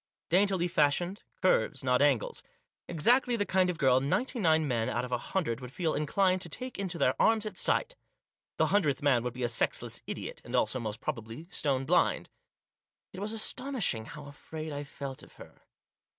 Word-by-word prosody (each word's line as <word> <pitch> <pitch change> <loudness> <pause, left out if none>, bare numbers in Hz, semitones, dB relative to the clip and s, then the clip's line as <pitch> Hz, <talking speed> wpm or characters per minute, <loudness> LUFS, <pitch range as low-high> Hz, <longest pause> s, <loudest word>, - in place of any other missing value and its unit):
Dantily 185 0 +3
fashioned, 175 +3 +1 0.2
curves 155 -7 +2
not 125 0 +2
angles. 140 -6 +2 0.5
Exactly 240 - +3
the 205 -3 0
kind 185 -1 +2
of 180 - -2
girl 130 -4 +4
ninety 245 - 0
nine 160 -5 +3
men 115 -4 0
out - - -1
of 125 - -9
a 125 - +2
hundred 140 -8 -2
would 125 -1 -8
feel 165 +1 -1
inclined 185 +5 +1
to 175 - -5
take 255 +9 -6
into 185 -3 -3
their 130 - +3
arms 225 -1 +4
at 210 -3 -5
sight. - - +1 0.6
The - - +4
hundredth 150 -10 +2
man 135 -5 +4
would 125 0 -3
be 125 - -4
a - - +2
sexless 115 - -2
idiot; - - -6
and, - - -5
also, 130 - +1
most 110 0 -5
probably, 120 +2 -5
stone 135 -5 0
blind. 175 +5 +2 0.8
It 185 - -7
was 205 +2 -3
astonishing 225 - 0
how 150 +2 -9
afraid 155 +2 -7
I 145 0 -4
felt 140 -1 -7
of - - -16
her. - - -15
155 Hz, 185 wpm, -30 LUFS, 130-190 Hz, 0.8 s, girl